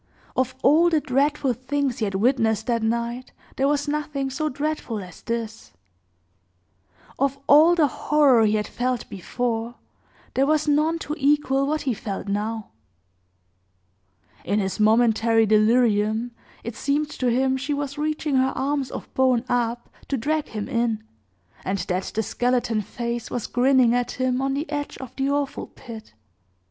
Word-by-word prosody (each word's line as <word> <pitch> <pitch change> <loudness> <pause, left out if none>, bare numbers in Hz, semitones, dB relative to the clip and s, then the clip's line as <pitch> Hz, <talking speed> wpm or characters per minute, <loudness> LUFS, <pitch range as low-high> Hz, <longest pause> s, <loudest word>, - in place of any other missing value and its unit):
Of 260 0 0
all 320 +5 +5
the 320 -2 +3
dreadful 280 -1 +1
things 265 +1 -2
he 220 - +1
had 195 -1 -3
witnessed 220 0 +2
that 235 -2 0
night, 235 +2 -2 0.2
there 270 - +1
was 290 0 0
nothing 290 -2 -2
so 310 +3 -1
dreadful 285 -4 -3
as 180 - -13
this; 230 -1 -5 1.5
of 275 0 +1
all 315 +5 +7
the 325 -3 +4
horror 280 -3 +3
he 210 - +2
had 210 0 0
felt 250 -1 -2
before, 230 +4 -3 0.6
there 270 +1 +2
was 305 0 +2
none 305 +3 +2
to 295 - -3
equal 275 -1 +2
what 310 +1 0
he 260 - 0
felt 205 -2 -5
now. 210 +2 -2 1.7
In 205 - 0
his 195 -1 -1
momentary 225 +1 +4
delirium, 220 +1 +3 0.3
it 235 -1 -6
seemed 290 +4 -1
to 255 - -2
him 260 +2 +2
she 275 +3 -2
was 285 0 -4
reaching 305 -2 0
her 260 +1 +2
arms 275 -1 -1
of - - -8
bone 255 -2 +2
up 240 -1 -1 0.2
to 275 - -1
drag 300 +5 -1
him 210 -2 -5
in, 230 -2 -1 0.6
and 195 +1 -1
that 180 0 -2
the 220 - +1
skeleton 240 -1 0
face 235 +3 -4
was 240 - -3
grinning 250 -1 +3
at 245 0 0
him 255 0 0
on 270 0 0
the 295 +3 -3
edge 290 -1 -3
of 260 - -9
the 270 0 0
awful 285 -1 -2
pit. 225 - -11
255 Hz, 155 wpm, -24 LUFS, 225-285 Hz, 1.7 s, all